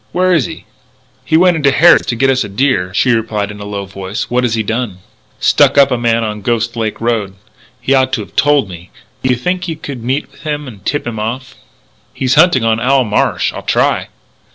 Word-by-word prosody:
Where 185 0 +2
is 155 -8 +2
he?" - - -10 0.6
"He 160 - +2
went 180 0 +4
into 145 -3 +3
Harrod's 170 +5 +5
to 120 - -1
get 135 +3 +2
us 130 0 +1
a - - -7
deer," 100 -4 0
she 125 +6 +2
replied 110 -3 -1
in 105 - -10
a 100 - -7
low 100 -1 -5
voice. 95 +2 -6
"What 125 +1 +1
has 115 -2 0
he 110 - -1
done?" 110 -3 -3 0.4
"Stuck - - +3
up 140 -1 +5
a - - +2
man 115 -1 +1
on 105 -1 -3
the - - -16
Ghost 115 0 -1
Lake 110 -2 -3
road. 110 -5 -1 0.4
He 130 +3 0
ought 130 -1 +2
to - - 0
have 105 - -12
told 145 -6 +3
me. 90 0 -11 0.3
Do 130 - -1
you 125 - +3
think 180 +9 -2
you 165 - -3
could 140 -6 -8
meet 130 +4 -1
up - - -27
with - - -19
him 150 -2 -4
and 105 -6 -11
tip 145 - -2
him 115 -2 -4
off?" 120 +4 -4 0.6
"He's 130 -1 0
hunting 155 -5 +4
on 115 0 +1
Owl 130 +2 +2
Marsh. 105 -3 0
I'll - - -6
try." - - 0
120 Hz, 235 wpm, -14 LUFS, 105-140 Hz, 0.6 s, Harrod's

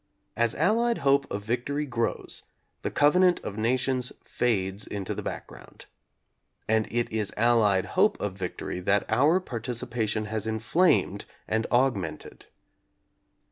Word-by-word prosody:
As 115 0 +1
Allied 235 +3 +2
hope 140 0 +2
of 100 - -4
victory 125 +7 -1
grows, 120 -4 -2 0.4
the - - -2
covenant 180 +5 +4
of 100 - -6
nations 125 +2 0
fades 100 -4 0
into 100 -2 -4
the - - -5
background. - - -8 0.8
And 110 0 +2
it 120 0 -1
is 110 -2 -2
Allied 105 -4 +3
hope - - +2
of 105 -2 -2
victory 90 -1 -5
that 100 +3 +1
our 145 +11 +4
participation 115 - -3
has 110 0 -3
inflamed 110 - +2 0.2
and 110 +1 0
augmented. 105 -11 -1
115 Hz, 125 wpm, -27 LUFS, 105-130 Hz, 0.8 s, covenant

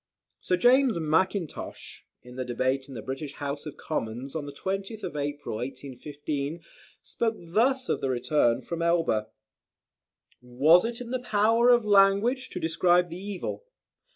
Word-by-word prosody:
Sir 180 - 0
James 250 +1 +4
Mackintosh, 165 +2 -2 0.2
in 125 0 -12
the 130 - -3
debate 130 +2 -1
in 135 - -10
the 110 - -6
British 135 +2 -5
House 145 +1 -5
of 150 - -8
Commons, 125 -1 -4
on 150 -2 -3
the - - -6
20th 195 +7 -4
April, 145 -5 -3
1815, 145 +4 -5 0.4
spoke 225 -1 -1
thus 240 +10 +1
of - - -1
the 135 - -1
return 125 -1 +1
from 170 -1 -4
Elba: 165 -11 +1 1.1
"Was 140 - +4
it 235 +1 -4
in 240 -1 -7
the 255 - -1
power 225 +1 +3
of 240 -2 +5
language 205 +6 +4
to - - -5
describe 175 +2 +2
the 175 +3 -8
evil. 200 - -5
165 Hz, 150 wpm, -27 LUFS, 140-205 Hz, 1.1 s, of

